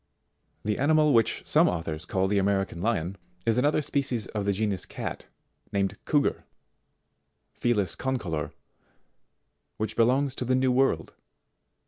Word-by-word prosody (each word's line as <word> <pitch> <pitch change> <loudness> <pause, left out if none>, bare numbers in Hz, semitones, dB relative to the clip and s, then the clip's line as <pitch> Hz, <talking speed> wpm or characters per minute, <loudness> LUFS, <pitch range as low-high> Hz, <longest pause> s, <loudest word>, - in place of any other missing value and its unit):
] - - -47
73. 105 - 0
The - - -5
animal 150 0 +4
which 115 -2 +2
some - - +4
authors 80 -2 -4
call 95 0 0
the 100 +1 +2
American 95 -3 0
Lion, 95 -3 -1 0.3
is 115 +1 +3
another 145 +3 +2
species 130 -6 -1
of 105 -2 -3
the 100 - +2
genus 100 -2 -1
cat, - - -6 0.4
named 100 -1 0
Couguar, 145 -2 +2 1.1
Felis 105 -7 0
Concolor, 90 - -2 1.3
which 110 -1 -2
belongs 130 +4 +3
to - - -3
the 130 +1 +2
new 130 0 +2
world. 125 -11 +1
110 Hz, 140 wpm, -27 LUFS, 95-130 Hz, 1.3 s, animal